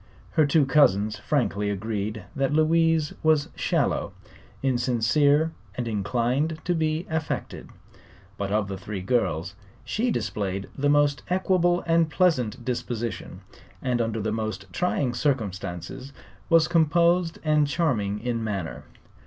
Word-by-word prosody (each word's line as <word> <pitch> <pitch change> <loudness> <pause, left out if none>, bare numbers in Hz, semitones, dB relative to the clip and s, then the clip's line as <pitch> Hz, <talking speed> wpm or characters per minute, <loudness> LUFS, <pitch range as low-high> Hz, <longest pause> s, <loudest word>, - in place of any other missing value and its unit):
Her 155 -2 +3
two 145 0 +4
cousins 110 -7 +3
frankly 105 -6 0
agreed 105 +1 -3
that 135 0 0
Louise 160 0 +3
was 155 -2 +3
shallow, - - 0 0.5
insincere 135 +5 +2 0.2
and 120 -2 -3
inclined 125 +8 0
to 180 - +1
be 160 0 0
affected; 160 -2 -4 0.7
but 100 0 -3
of 105 -1 +1
the 95 -1 -5
three 100 -1 -5
girls 90 -5 0 0.3
she 240 +3 0
displayed 100 - -2
the 145 +1 +1
most 145 0 +3
equable 180 -1 +2
and 165 -1 +3
pleasant 130 - +1
disposition 120 -2 -4 0.4
and 125 -2 0
under 115 -1 -1
the 110 +1 -1
most 110 -3 -3
trying 145 -8 0
circumstances 110 - -3 0.4
was 165 -1 +5
composed 170 +1 +3
and 150 -2 +3
charming 115 -10 0
in 120 -2 -2
manner. 100 -7 -4
130 Hz, 125 wpm, -25 LUFS, 105-160 Hz, 0.7 s, was